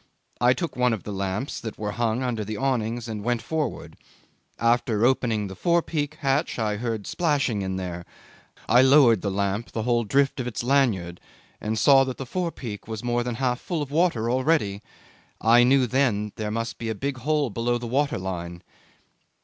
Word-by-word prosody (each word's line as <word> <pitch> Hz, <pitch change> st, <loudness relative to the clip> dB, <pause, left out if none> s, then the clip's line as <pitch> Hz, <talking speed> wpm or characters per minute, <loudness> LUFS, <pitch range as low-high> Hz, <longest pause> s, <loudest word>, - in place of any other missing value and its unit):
I 125 Hz, +1 st, +5 dB
took 170 Hz, +4 st, -4 dB
one 125 Hz, -1 st, +2 dB
of 110 Hz, -, -4 dB
the 105 Hz, -, -6 dB
lamps 100 Hz, +7 st, -3 dB
that 110 Hz, -2 st, -6 dB
were 105 Hz, -1 st, -3 dB
hung 120 Hz, +2 st, -1 dB
under 120 Hz, -4 st, -2 dB
the 105 Hz, +1 st, -5 dB
awnings 120 Hz, -3 st, -1 dB
and 110 Hz, -2 st, -5 dB
went 120 Hz, +1 st, 0 dB
forward. 150 Hz, -1 st, -3 dB, 0.6 s
After 115 Hz, -1 st, +2 dB
opening 115 Hz, -5 st, +1 dB
the 95 Hz, -1 st, -7 dB
forepeak 160 Hz, -, 0 dB
hatch 140 Hz, +3 st, 0 dB
I 105 Hz, -3 st, -1 dB
heard 110 Hz, -3 st, -3 dB
splashing 145 Hz, -, 0 dB
in 95 Hz, -1 st, -3 dB
there. 90 Hz, -2 st, -5 dB, 0.6 s
I 120 Hz, +2 st, +6 dB
lowered 130 Hz, -6 st, +6 dB
then 100 Hz, -, -1 dB
the 95 Hz, -, -4 dB
lamp 100 Hz, +3 st, -1 dB
the 110 Hz, -, -2 dB
whole 120 Hz, 0 st, +2 dB
drift 135 Hz, +6 st, +1 dB
of 125 Hz, -, -2 dB
its 120 Hz, -, -4 dB
lanyard, 115 Hz, -10 st, +1 dB, 0.4 s
and 110 Hz, +1 st, -2 dB
saw 135 Hz, +4 st, +6 dB
that 130 Hz, -1 st, -5 dB
the 135 Hz, -, -5 dB
forepeak 130 Hz, -, -4 dB
was 110 Hz, -1 st, -5 dB
more 120 Hz, 0 st, 0 dB
than 120 Hz, -1 st, -3 dB
half 125 Hz, 0 st, 0 dB
full 165 Hz, -5 st, -2 dB
of 140 Hz, -, -9 dB
water 155 Hz, -8 st, +1 dB
already. 130 Hz, -7 st, +1 dB, 0.6 s
I 115 Hz, +2 st, +5 dB
knew 130 Hz, +1 st, +4 dB
then 110 Hz, -5 st, +1 dB
there 110 Hz, -2 st, -3 dB
must 115 Hz, +2 st, -3 dB
be 115 Hz, -, -3 dB
a 110 Hz, -, -2 dB
big 140 Hz, +5 st, -3 dB
hole 145 Hz, -1 st, 0 dB
below 120 Hz, +3 st, 0 dB
the 120 Hz, -, -7 dB
water 140 Hz, +5 st, 0 dB
line. 85 Hz, -2 st, -5 dB
120 Hz, 190 wpm, -25 LUFS, 105-135 Hz, 0.6 s, I